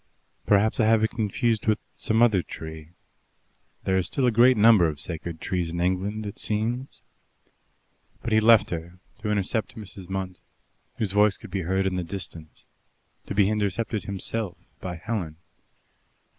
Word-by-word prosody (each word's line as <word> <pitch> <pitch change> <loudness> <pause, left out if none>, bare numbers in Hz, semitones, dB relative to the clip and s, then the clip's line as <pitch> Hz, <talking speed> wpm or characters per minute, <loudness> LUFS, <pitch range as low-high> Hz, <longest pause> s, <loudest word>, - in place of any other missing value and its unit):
"Perhaps 105 +1 +3
I 110 - +4
have 110 0 +4
confused 110 0 0
it - - +2
with 110 - +2
some 110 +1 +2
other 105 -6 +4
tree. 80 -1 -9 0.9
There 95 - +1
are 95 - +3
still 110 +9 0
a 125 - +4
great 120 +2 +5
number 105 -5 +6
of 75 -3 -4
sacred 80 +2 -5
trees 90 -2 -2
in 85 - -3
England, 95 +4 -1
it 100 - -7
seems." 115 +5 -2 1.2
But 115 - -3
he 110 - +6
left 110 0 +5
her 85 +1 -5 0.2
to 105 -1 -3
intercept 105 +1 -1
Mrs. 95 -4 -9
Munt, 95 -1 -4 0.6
whose 105 -4 -1
voice 105 0 +4
could - - -12
be 95 - -1
heard 95 +3 0
in 95 -1 0
the 90 - -1
distance: 85 -3 -6 0.6
to - - -4
be 100 -1 +4
intercepted 105 +1 -1
himself 100 0 -2 0.2
by 90 -1 -5
Helen. 90 -4 -4
100 Hz, 160 wpm, -25 LUFS, 90-110 Hz, 1.2 s, number